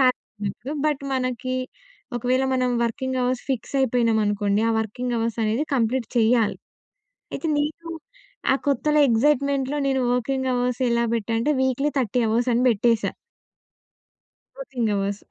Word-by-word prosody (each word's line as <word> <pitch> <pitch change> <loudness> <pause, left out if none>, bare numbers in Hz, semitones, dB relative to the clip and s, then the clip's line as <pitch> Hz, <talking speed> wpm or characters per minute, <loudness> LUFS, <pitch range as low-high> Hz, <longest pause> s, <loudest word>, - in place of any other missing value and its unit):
ఖాళీ 255 -1 +4 0.3
అప్పుడు 270 +9 -7
బట్, 295 -2 0
మనకి 255 0 -2 0.6
ఒకవేళ 250 +2 +1
మనం 255 -1 +1
వర్కింగ్ 260 +2 -2
అవర్స్ 250 0 0
ఫిక్సయిపోయినాం 245 -3 +1
అనుకోండి, 205 0 +1
ఆ - - +2
వర్కింగ్ 240 +3 -3
అవర్సనేది 225 +3 0
కంప్లీట్ 240 0 0
చేయాలి. 225 -1 +3 0.8
అయితే, 330 - -3
నేను 315 +3 -3 0.6
ఆ - - +4
కొత్తలో 300 +2 +2
ఎక్సైట్మెంట్‌లో 280 +3 +2
నేను 265 -1 +1
వర్కింగ్ 260 +2 -1
అవర్స్ 245 +1 -1
ఎలా 235 0 +2
బెట్టానంటే, 230 +6 0
వీక్లీ 265 +3 +1
30 245 0 0
అవర్స్ 235 +3 +1
అని 240 - +2
బెట్టేసా. 230 0 +1 1.5
Working 245 - -2
hours 200 0 -2
250 Hz, 125 wpm, -23 LUFS, 230-265 Hz, 1.5 s, ఖాళీ